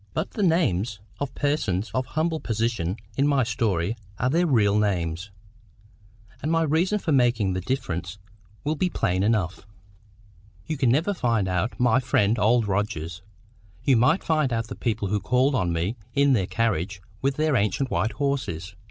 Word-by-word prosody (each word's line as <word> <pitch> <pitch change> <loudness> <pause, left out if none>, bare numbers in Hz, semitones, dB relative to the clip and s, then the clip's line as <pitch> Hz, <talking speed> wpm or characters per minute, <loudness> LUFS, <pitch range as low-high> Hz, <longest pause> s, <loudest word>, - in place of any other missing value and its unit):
But 160 - -2
the 215 - -4
names 120 - +1 0.2
of 140 -1 -3
the - - -15
persons 115 -9 0
of 130 0 -1
humble 160 +1 -1
position 110 - -1 0.2
in 140 +1 +3
my 140 -3 +3
story 105 -4 0 0.2
are 125 +2 0
their 170 +3 +2
real 105 -7 +3
names. 90 -3 -1 1.1
And 155 - -1
my 165 0 +3
reason 165 +7 +2
for 180 -5 -2
making 120 -8 +3
the 95 - -2
difference 90 -6 -3 0.5
will 150 - 0
be 180 +4 0
plain 95 - 0
enough. 100 -4 0 1.0
You 155 - -2
can 135 -4 +2
never 160 +11 +2
find 115 - 0
out 90 +6 -1
my 125 0 +4
friend 115 -4 +2
Old 110 +1 +3
Rogers; 85 -5 -2 0.6
you 135 - +4
might 125 +10 +3
find 155 -5 +1
out 115 -1 -2
the - - -5
people 110 -4 -2
who 105 +1 +1
called 130 +6 +2
on 90 -9 +1
me 85 +8 -1 0.2
in 140 0 +4
their 95 -7 +1
carriage 100 -5 -1 0.2
with 135 0 +1
the 155 -1 +1
ancient 120 +4 0
white 110 +1 0
horses. 115 - -2
115 Hz, 170 wpm, -25 LUFS, 100-140 Hz, 1.1 s, my